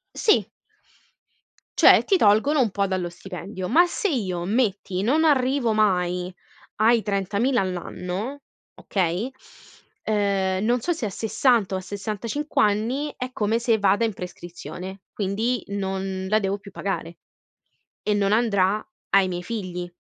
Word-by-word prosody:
Sì. 430 - +3 1.3
Cioè, - - +7
ti 390 - +3
tolgono 220 +7 +4
un 235 -4 +2
po' 200 +1 0
dallo 185 -2 -2
stipendio. 185 +2 -7
Ma 345 +8 +5
se 405 +4 -1
io, 190 - -2
metti, 200 -3 0
non 290 +9 +2
arrivo 265 -5 +2
mai 180 -4 +1 0.4
ai 225 +1 +4
30.000 205 +6 0
all'anno, 185 +7 -4 0.3
okay 190 +5 -1 0.7
ehm, 200 -2 0
non 240 +2 +2
so 350 - 0
se 300 -9 -3
a - - -3
60, 225 0 +1
o - - 0
a - - -5
65 215 +9 -3
anni, 225 +8 +1
è 255 0 -5
come 220 -1 0
se 230 -1 +2
vada 205 +2 +3
in 225 - 0
prescrizione, 180 +1 -8
quindi, 215 +4 -1
non 190 -1 -3
la 215 +2 +3
devo 195 0 -1
più 200 - -13
pagare, 180 -4 -4 0.8
e 210 - +1
non 200 -1 +1
andrà 210 -2 +2 0.3
ai 195 -1 +4
miei 175 -1 -4
figli. 180 -4 -5
205 Hz, 140 wpm, -24 LUFS, 190-235 Hz, 1.3 s, Cioè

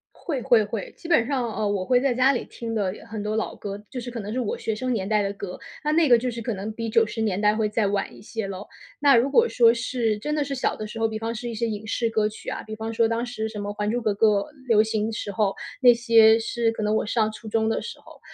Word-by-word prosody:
会 280 -7 -4
会 225 -2 +4
会， 205 -1 -5
基 335 - -10
本 270 -9 +4
上， 260 -3 -1
呃， 215 - -1
我 200 -2 -1
会 245 +4 +3
在 270 0 +2
家 255 +3 +4
里 245 - -2
听 230 -1 -6
的 200 -4 0 0.2
很 215 -1 -5
多 210 +1 -2
老 220 - -2
歌， 200 0 -7
就 250 - -5
是 245 +1 -6
可 235 -1 -5
能 205 +1 -6
是 255 - -1
我 230 - -2
学 220 - -2
生 255 +4 -2
年 195 -5 -2
代 210 -1 +2
的 200 0 -2
歌。 200 -2 -7 0.3
那 300 - +1
那 320 -1 +4
个 240 -2 +7
就 250 +2 -2
是 235 -1 -6
可 230 0 -2
能 200 +2 -5
比 230 +1 -4
90 225 0 +1
年 205 -3 0
代 210 0 +3
会 215 -1 0
再 210 0 0
晚 200 0 -2
一 - - -14
些 220 0 -5
咯。 195 +1 -7 0.3
那 285 -3 +6
如 245 +4 +3
果 470 +10 +4
说 230 - +5
是 235 -2 -1
真 300 +8 -2
的 300 - +1
是 280 0 -4
小 255 - -1
的 215 - -5
时 215 - -8
候， 225 0 +2
比 220 0 -4
方 225 +1 -3
是 240 +2 -5
一 235 - -5
些 230 +1 -1
影 215 0 -5
视 230 +1 0
歌 215 -1 +1
曲 215 - -8
啊， - - -4
比 215 - -6
方 220 +1 -4
说 225 0 +3
当 230 +1 -1
时 230 -3 -4
什 215 -1 -6
么 205 0 -4
《还 210 0 -2
珠 240 +2 -1
格 215 -2 +1
格》 215 +2 +3 0.4
流 220 -3 +5
行 220 0 -1
时 210 - -4
候， 200 0 +1 0.3
那 245 -2 +7
些 230 -1 +6
是 230 0 0
可 225 - -5
能 210 0 +1
我 - - 0
上 220 0 +1
初 220 +1 -10
中 220 +1 +1
的 225 - 0
时 470 - -8
候。 - - -16
225 Hz, 310 characters per minute, -24 LUFS, 210-240 Hz, 0.4 s, 个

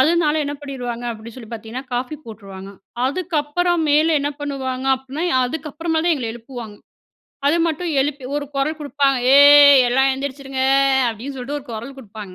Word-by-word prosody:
அதனால 315 +1 +3
என்ன 290 +1 -4
பண்ணிருவாங்க, 245 -4 -6
அப்படின்னு 225 +1 -11
சொல்லி 230 -4 -11
பார்த்தீங்கன்னா 230 +4 -7
காஃபி 250 +5 -3
போட்ருவாங்க. 195 -3 -10 0.4
அதுக்கப்புறம் 335 +2 -1
மேல 310 +2 +4
என்ன 290 +1 -1
பண்ணுவாங்க 265 -2 -4
அப்டினா, 265 +4 -7 0.2
அதுக்கப்புறமேல் 320 +4 -3
தான் 340 - +4
எங்கள 240 -4 -4
எழுப்புவாங்க. 230 -3 -9 0.7
அது 310 +4 +3
மட்டும் 330 +2 -2
எழுப்பி 275 -1 -2
ஒரு 290 - -2
கொரல் 290 +3 -1
குடுப்பாங்க 275 -2 +1 0.2
"ஏய் 285 -1 +8
எல்லாம் 265 +2 +3
எந்திரிச்சிருங்க!" 270 0 -4 0.5
அப்டின்னு 235 +5 -6
சொல்லிட்டு 270 +3 -4
ஒரு - - -17
கொரல் 235 +5 -7
குடுப்பாங்க 210 -5 -10
275 Hz, 150 wpm, -20 LUFS, 245-295 Hz, 0.7 s, ஏய்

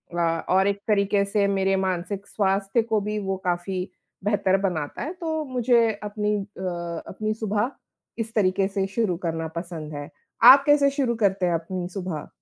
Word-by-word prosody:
अ, 165 -1 0
और 190 +2 +4
एक 200 0 0
तरीक़े 200 -1 +2
से 200 0 +1
मेरे 195 -1 +1
मानसिक 190 +1 -2
स्वास्थ्य 195 +2 +1
को 220 -2 +1
भी 210 +1 -3
वो 195 -1 -2
काफ़ी 180 +1 -2 0.4
बेहतर 195 -2 +2
बनाता 160 -7 -2
है, 320 +5 -4
तो 320 -3 -3
मुझे 240 -3 +3
अपनी 210 0 -1
अ, 180 -4 -5
अपनी 215 +3 -2
सुबह 215 +3 -1 0.5
इस 225 0 -3
तरीक़े 195 -1 +2
से 195 -1 -1
शुरू 195 -4 -1
करना 165 0 -2
पसंद 165 -3 -6
है। 145 0 -6 0.3
आप 270 +3 +10
कैसे 290 -1 +5
शुरू 270 -4 0
करते 195 -4 +1
हैं 175 - +1
अपनी 175 +2 -3
सुबह? 180 -5 -5
195 Hz, 170 wpm, -24 LUFS, 180-215 Hz, 0.5 s, आप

